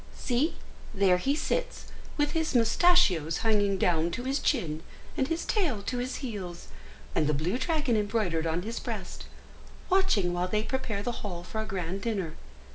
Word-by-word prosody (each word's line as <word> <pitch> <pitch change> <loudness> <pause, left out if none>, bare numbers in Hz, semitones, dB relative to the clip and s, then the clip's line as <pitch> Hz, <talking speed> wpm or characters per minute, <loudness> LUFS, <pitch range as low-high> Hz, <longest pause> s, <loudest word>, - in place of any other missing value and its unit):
See, 265 +6 0 0.4
there 190 -2 +4
he 275 +9 +1
sits, - - -2 0.3
with 295 -1 +2
his 320 -4 -1
moustachios 225 - +4
hanging 205 -3 +3
down 170 -2 +2
to 245 - -3
his 270 +2 0
chin, 160 - 0 0.3
and 265 - +1
his 330 +2 -2
tail 300 - 0
to 245 +4 -2
his 255 +1 -2
heels, 185 -7 -6 0.4
and 150 - +2
the 150 - +2
blue 175 - -1
dragon 295 -4 +1
embroidered 205 -6 0
on 165 +2 -1
his 230 +3 -4
breast, - - -6 0.7
watching 230 - +3
while 175 +1 0
they 210 +3 0
prepare 225 -5 -2
the 245 - -1
hall 175 -4 -5
for 220 +4 -4
a - - -4
grand 190 -1 -3
dinner. 195 -8 -2
215 Hz, 170 wpm, -29 LUFS, 180-265 Hz, 0.7 s, there